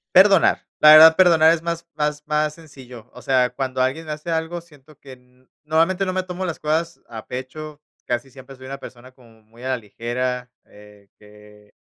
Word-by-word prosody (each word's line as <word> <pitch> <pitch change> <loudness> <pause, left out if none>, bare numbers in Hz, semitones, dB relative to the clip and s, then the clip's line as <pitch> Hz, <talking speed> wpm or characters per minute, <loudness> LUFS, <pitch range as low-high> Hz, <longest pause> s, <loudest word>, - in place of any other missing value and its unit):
Perdonar, 195 -1 +5 0.2
la 150 - +8
verdad, 160 +1 +9
perdonar 165 -3 +5
es 165 -1 -4
más 170 0 -4
más 150 -1 -2
más 150 0 0
sencillo, 130 -7 -14
o 125 - -12
sea, 130 -2 +2
cuando 130 +1 -4
alguien 140 +5 -2
hace 150 +2 -6
algo, 165 +1 -3
siento 150 -3 -21
que 135 -2 -13 0.5
normalmente 165 +5 +1
no 185 - -3
me 185 - -1
tomo 185 0 -6
las 170 -3 -5
cosas 165 +2 -2
a 110 -2 -9
pecho, 145 +4 -8 0.2
casi 120 +2 -3
siempre 135 0 -14
soy 130 0 -13
una 140 +1 -6
persona 125 0 -13
como 115 -4 -22
muy 115 +3 -18
a 130 - -4
la 130 - 0
ligera, 125 +3 -5
eh, 105 -1 -19
que 105 0 -19
140 Hz, 185 wpm, -21 LUFS, 125-160 Hz, 0.5 s, verdad